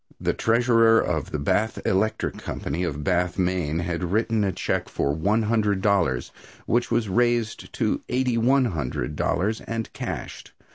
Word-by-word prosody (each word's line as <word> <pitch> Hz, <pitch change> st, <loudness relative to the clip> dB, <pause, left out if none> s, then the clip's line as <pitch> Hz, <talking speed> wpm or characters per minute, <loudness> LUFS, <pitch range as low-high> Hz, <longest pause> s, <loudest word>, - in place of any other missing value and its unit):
The -, -, 0 dB
treasurer 115 Hz, -1 st, +4 dB
of -, -, -1 dB
the -, -, -3 dB
Bath 105 Hz, +10 st, 0 dB
Electric 105 Hz, +4 st, 0 dB
Company, 90 Hz, -, -4 dB
of 75 Hz, -4 st, -3 dB
Bath, 90 Hz, +2 st, 0 dB
Maine, 90 Hz, -4 st, 0 dB
had 85 Hz, +1 st, -2 dB
written 110 Hz, 0 st, +1 dB
a 100 Hz, -, +1 dB
check -, -, -2 dB
for 70 Hz, -, 0 dB
one 100 Hz, +9 st, +1 dB
hundred 105 Hz, -3 st, +1 dB
dollars, 85 Hz, -, +1 dB, 0.3 s
which 120 Hz, +1 st, +1 dB
was 115 Hz, -2 st, +1 dB
raised 120 Hz, +2 st, 0 dB
to -, -, 0 dB
eighty 125 Hz, -1 st, +1 dB
one 130 Hz, +3 st, +3 dB
hundred 75 Hz, -, -3 dB
dollars 105 Hz, +8 st, 0 dB
and 115 Hz, -1 st, -4 dB
cashed. -, -, -6 dB
105 Hz, 155 wpm, -24 LUFS, 85-115 Hz, 0.3 s, treasurer